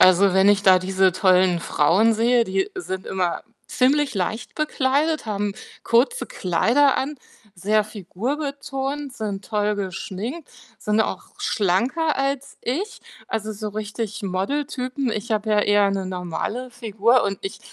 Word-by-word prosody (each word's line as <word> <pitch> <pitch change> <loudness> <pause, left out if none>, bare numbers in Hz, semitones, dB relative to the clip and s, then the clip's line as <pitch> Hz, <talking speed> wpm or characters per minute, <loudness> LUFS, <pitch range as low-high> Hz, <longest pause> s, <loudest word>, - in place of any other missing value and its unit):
Also 185 +1 +6
wenn 190 +1 +5
ich 205 0 +4
da 185 -2 +7
diese 190 0 +2
tollen 185 -1 +3
Frauen 185 +9 +3
sehe, 235 +2 +3
die 195 - -1
sind 190 - -5
immer 180 -2 -1 0.2
ziemlich 275 +1 +2
leicht 200 +5 -3
bekleidet, 300 0 0
haben 205 -1 -1 0.3
kurze 250 - +2
Kleider 235 - +2
an, 285 +2 -2 0.4
sehr 210 +4 +2
figurbetont, 270 - -4
sind 205 -5 -5
toll 210 -1 0
geschminkt, 205 - -5 0.3
sind 210 +1 +1
auch - - -2
schlanker 265 - +1
als 275 0 -2
ich, 360 - -3 0.3
also 215 -1 -3
so 210 0 -5
richtig 215 +1 -5
Model-Typen. 255 +6 -2
Ich 220 +2 -3
habe 215 0 -1
ja 210 - +4
eher 205 -1 +3
'ne 195 -1 -2
normale 185 +7 -4
Figur 230 0 +2
und 195 -1 -2
ich 390 - -5
215 Hz, 140 wpm, -23 LUFS, 195-265 Hz, 0.4 s, da